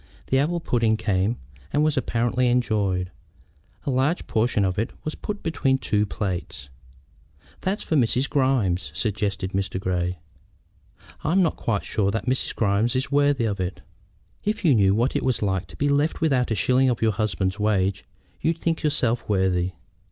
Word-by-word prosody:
The 135 - +4
apple 170 +5 +1
pudding 115 -7 +1
came, 105 +1 0 0.3
and 150 - +2
was 155 -1 +2
apparently 120 -1 +1
enjoyed. 100 -7 +1 0.7
A 140 - 0
large 135 +7 +1
portion 110 -2 +1
of 95 +1 -1
it 115 - 0
was 155 - -3
put 210 -1 -6
between 135 -5 +1
two 105 -5 0
plates. 90 - -4 0.9
"That's 195 +3 -2
for 160 - -1
Mrs. 130 0 +2
Grimes," 130 -11 +1
suggested 100 -3 -1
Mr. 95 -1 -2
Grey. 90 -1 -1 1.1
"I 155 - +1
am 190 0 +5
not 165 - +1
quite 105 -4 -2
sure 100 -2 0
that 110 +3 -2
Mrs. 130 +1 -1
Grimes 110 +3 +1
is 130 +2 -1
worthy 145 -3 +3
of 100 -3 -2
it." 90 0 -3 0.6
"If 210 -1 -2
you 150 - +6
knew 100 -4 +4
what 120 +5 +1
it - - +1
was 130 -2 +1
to 95 -5 -2
be 145 - +1
left 145 +2 +1
without 135 -6 +2
a 110 - +1
shilling 130 +7 +3
of 120 -2 -1
your 110 - +4
husband's 95 -1 -1
wages 100 -2 +1 0.4
you'd 165 0 0
think 165 0 -1
yourself 120 -7 0
worthy." 95 -2 +1
115 Hz, 170 wpm, -24 LUFS, 95-135 Hz, 1.1 s, you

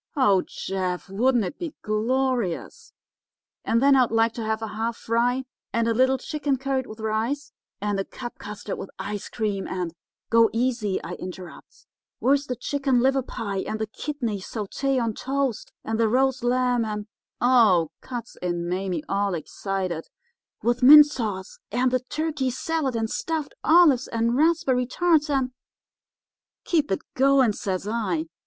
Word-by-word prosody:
Oh, 205 -10 +4
Jeff, 185 -1 -4
wouldn't 235 +3 +2
it 180 - -6
be 335 -4 -5
glorious! 235 -2 -1 0.7
And 230 +3 +1
then 280 0 +6
I'd 255 -3 +4
like 225 0 +2
to 230 - -5
have 220 0 -1
a 220 - -3
half 225 +2 -3
fry, 245 +3 +1 0.3
and 230 0 +1
a 230 - +2
little 260 +3 +3
chicken 285 +1 -2
curried 265 -1 -2
with 215 +1 -10
rice, 220 +6 -2 0.3
and 205 -1 -1
a - - 0
cup 240 +4 -9
custard 210 0 -6
with - - -6
ice 205 0 -5
cream, 205 -4 -2
and—' 180 -3 -3 0.4
"'Go 230 -1 +6
easy,' 230 -4 0
I 170 - -6
interrupts; 185 -1 -10 0.3
'where's 280 +2 +2
the 250 - -2
chicken 270 0 0
liver 270 +2 +3
pie, 205 -5 -4
and 215 - -3
the 220 - -2
kidney 235 -2 -4
sauté 245 +7 -2
on 230 -2 0
toast, 270 -1 -2
and 225 0 -2
the 225 -1 +3
roast 260 +1 +2
lamb, 245 -1 +2
and—' 210 -1 -4 0.3
"'Oh,' 220 -10 +4
cuts 240 -3 -7
in 175 -1 -2
Mame, 180 -2 -2
all 200 -1 0
excited, 185 0 -4 0.6
'with 240 +2 +1
mint 295 +4 +10
sauce, 215 -9 -5
and 250 +3 +2
the 255 - +2
turkey 290 +1 -2
salad, 280 0 -1
and 225 -1 0
stuffed 315 +5 -3
olives, 310 -7 +5
and 230 +1 0
raspberry 275 -5 +2
tarts, 320 +1 +2
and—' 265 -3 +1 1.1
"'Keep 310 -4 +1
it 190 - 0
going,' 265 -4 +4
says 190 -1 -3
I. 200 -8 -1
235 Hz, 160 wpm, -25 LUFS, 205-265 Hz, 1.1 s, mint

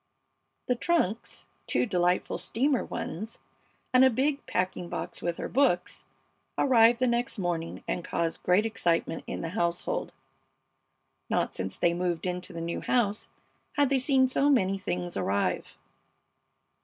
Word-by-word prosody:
The 250 - +2
trunks, 240 - -1 0.2
two - - +2
delightful 180 -4 +1
steamer 265 +3 +1
ones, 215 +7 -5 0.5
and 255 +1 +7
a 260 - +7
big 275 +4 0
packing 180 -1 -1
box - - -5
with 170 -1 -2
her - - -3
books, 245 -10 +1 0.5
arrived 235 -3 +5
the 255 - +3
next 240 -1 0
morning 175 -3 -3
and 175 - -2
caused 165 0 -2
great 185 +4 +3
excitement 170 -6 0
in - - -4
the 165 - -3
household. 170 -2 -1 1.2
Not - - 0
since 95 0 -4
they 170 - +2
moved 175 -1 -1
into 180 0 -3
the 165 - -6
new 170 0 -3
house 215 -4 0 0.4
had 285 -2 +2
they 270 - +4
seen 260 0 +3
so 275 +2 +2
many 195 -8 +2
things 175 -2 -3
arrive. 100 +1 -1
195 Hz, 145 wpm, -28 LUFS, 175-255 Hz, 1.2 s, and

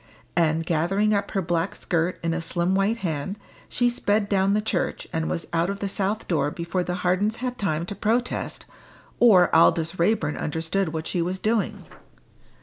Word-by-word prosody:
And, 165 -1 +2
gathering 195 +7 +1
up 200 0 0
her 195 -2 -1
black 170 +2 -1
skirt 175 0 -1
in 165 0 0
a 170 - -2
slim 175 +2 -1
white 195 +4 +2
hand, 160 +5 -3 0.3
she 245 - +1
sped 210 -3 +1
down 195 0 +2
the - - +3
church, 210 -4 -2
and 160 0 -1
was 170 - -2
out 170 +2 +1
of 200 - -3
the 200 - -2
south 200 +2 -2
door 160 -4 +1
before 170 +3 -2
the 180 0 -3
Hardens 200 +5 +2
had 250 +1 -4
time 170 -4 -1
to 190 - -5
protest, 230 +5 -1 0.5
or 190 -9 +6
Aldous 165 +1 +3
Raeburn 195 -3 +1
understood 165 +4 -1
what 160 0 -4
she 175 - -1
was 180 +2 -1
doing. 215 -1 -1
185 Hz, 180 wpm, -24 LUFS, 165-205 Hz, 0.5 s, or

